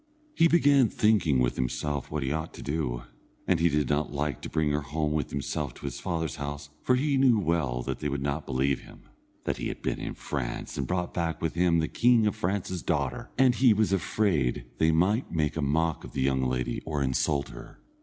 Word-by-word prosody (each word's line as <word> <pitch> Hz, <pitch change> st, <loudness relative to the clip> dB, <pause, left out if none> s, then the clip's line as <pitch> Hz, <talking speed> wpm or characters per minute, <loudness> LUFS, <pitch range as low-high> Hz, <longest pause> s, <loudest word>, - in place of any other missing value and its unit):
He 165 Hz, -, +5 dB
began 145 Hz, -7 st, +5 dB
thinking 100 Hz, -10 st, +3 dB
with 60 Hz, -1 st, +1 dB
himself 70 Hz, +3 st, -2 dB
what 75 Hz, -2 st, -2 dB
he 65 Hz, -, -1 dB
ought 80 Hz, +2 st, -3 dB
to -, -, -9 dB
do, 70 Hz, -5 st, -2 dB, 0.4 s
and 90 Hz, -, +3 dB
he 85 Hz, +1 st, +4 dB
did 75 Hz, -2 st, +1 dB
not 75 Hz, +1 st, 0 dB
like 70 Hz, -2 st, -2 dB
to -, -, -6 dB
bring 75 Hz, -2 st, +1 dB
her 75 Hz, +1 st, 0 dB
home 75 Hz, +1 st, -2 dB
with 75 Hz, -3 st, -1 dB
himself 70 Hz, -1 st, -3 dB
to -, -, -10 dB
his 70 Hz, -3 st, -4 dB
father's 80 Hz, -2 st, -2 dB
house, 70 Hz, 0 st, -6 dB
for 125 Hz, -, +3 dB
he 140 Hz, +2 st, +1 dB
knew 130 Hz, -4 st, +5 dB
well 80 Hz, -10 st, 0 dB
that -, -, -3 dB
they 75 Hz, -, -2 dB
would 70 Hz, -1 st, -2 dB
not 70 Hz, +2 st, -2 dB
believe 70 Hz, +1 st, +1 dB
him, -, -, -15 dB, 0.4 s
that -, -, -1 dB
he -, -, -3 dB
had -, -, -6 dB
been -, -, -1 dB
in -, -, -5 dB
France 60 Hz, -5 st, -4 dB
and 70 Hz, -, -2 dB
brought 90 Hz, -1 st, -2 dB
back 85 Hz, -2 st, -1 dB
with 80 Hz, -, -2 dB
him 85 Hz, -1 st, +3 dB
the 80 Hz, -1 st, +1 dB
king 120 Hz, -2 st, +4 dB
of 105 Hz, -, +1 dB
France's 95 Hz, -3 st, -2 dB
daughter, -, -, -2 dB
and 130 Hz, -1 st, +5 dB
he 120 Hz, -2 st, +5 dB
was 105 Hz, -2 st, +2 dB
afraid 80 Hz, -, +1 dB
they 80 Hz, -, +4 dB
might 95 Hz, +10 st, +2 dB
make 75 Hz, -3 st, 0 dB
a 80 Hz, -, -1 dB
mock 80 Hz, +2 st, 0 dB
of -, -, -10 dB
the 65 Hz, -, -2 dB
young 65 Hz, 0 st, +2 dB
lady 65 Hz, -1 st, -1 dB
or 75 Hz, -3 st, -1 dB
insult 70 Hz, +2 st, 0 dB
her. -, -, -11 dB
75 Hz, 225 wpm, -28 LUFS, 70-95 Hz, 0.4 s, He